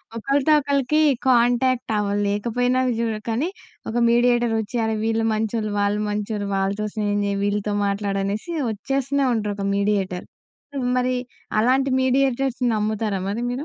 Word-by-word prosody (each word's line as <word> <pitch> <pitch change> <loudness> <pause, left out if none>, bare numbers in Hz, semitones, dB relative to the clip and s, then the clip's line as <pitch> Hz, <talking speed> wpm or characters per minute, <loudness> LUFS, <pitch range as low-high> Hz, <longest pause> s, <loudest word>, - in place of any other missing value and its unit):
ఒకలితో 275 +6 +1
ఒకలికి 280 +1 +1 0.3
contact 245 0 +2
అవ్వలేకపోయినా 210 +5 0
అవజూ 235 -2 0 0.2
కానీ, 255 +10 0 0.4
ఒక 230 - -2
mediator 240 -1 +3
ఒచ్చి, 220 +3 -8
అరె! 220 0 0
వీళ్ళు 225 0 +1
మంచోళ్ళు, 215 0 -1
వాళ్ళు 205 +1 +1
మంచోళ్ళు, 210 0 -3
వాళ్ళతో 195 +2 -1
స్నేహం 205 -1 0
జేయి, 200 0 -1
వీళ్ళతో 205 0 -1
మాట్లాడనేసి 200 - -2 0.2
వచ్చేస్తూనే 275 +5 -1
ఉంటారు, 210 -2 -1
ఒక 200 - -3
మీడియేటర్. 200 -3 0 0.5
సో 280 - -6 0.2
మరి 255 0 +1 0.5
అలాంటి 265 +4 +2
మీడియేటర్స్‌ని 260 -1 +1
నమ్ముతారా 210 -1 -1
మరి 210 - -2
మీరు? 245 0 -1
225 Hz, 130 wpm, -22 LUFS, 205-255 Hz, 0.5 s, మీడియేటర్